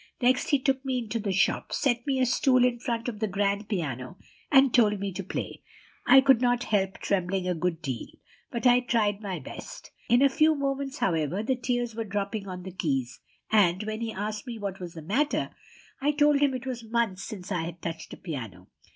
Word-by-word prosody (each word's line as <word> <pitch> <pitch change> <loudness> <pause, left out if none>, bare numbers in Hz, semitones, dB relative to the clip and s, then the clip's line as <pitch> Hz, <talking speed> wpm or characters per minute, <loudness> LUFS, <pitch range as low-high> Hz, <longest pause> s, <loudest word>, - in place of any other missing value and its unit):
Next 250 0 +2
he 285 - +5
took 265 0 0
me 260 -2 -1
into 230 -1 -3
the 205 -2 -2
shop, 190 0 +1
set 240 -3 0
me 270 -2 +1
a 255 - +4
stool 255 0 +3
in 245 -1 0
front 235 0 -3
of 225 -3 -5
a 220 - +1
grand 200 +1 -1
piano, 145 - -3 0.3
and 270 -3 +6
told 210 -4 +4
me 195 -1 -3
to 195 - -4
play. 185 - -5 0.5
I 270 - +9
could 265 -3 +5
not 245 -1 +2
help 195 -5 0
trembling 185 -1 -1
a 180 - +1
good 170 0 -2
deal, 130 -5 -4 0.4
but 235 +1 -4
I 245 0 +7
tried 220 -4 0
my 195 -4 -3
best. 140 - -9 0.2
In 245 +3 +5
a - - +8
few 310 +3 +3
moments, 275 0 -2
however, 170 - 0
the 260 +3 +1
tears 245 -1 -2
were 225 +1 -3
dropping 200 0 -3
on 180 -1 -6
the 190 - -7
keys; 135 -8 -2 0.3
and, 195 -3 +4
when 215 +1 -4
he 230 -1 -2
asked 210 +3 -4
me 235 -2 -5
what 200 -2 -5
was 175 -2 -8
the 160 - -8
matter, 270 - 0 0.5
I 295 +2 +2
told 295 -1 +4
him 280 -2 +2
it 255 0 -6
was 250 -3 -4
months 225 -4 -1
since 205 -3 -8
I 180 -3 0
had 170 +1 -6
touched 165 -1 -5
a - - -8
piano. 115 - -7
215 Hz, 215 wpm, -27 LUFS, 185-250 Hz, 0.5 s, I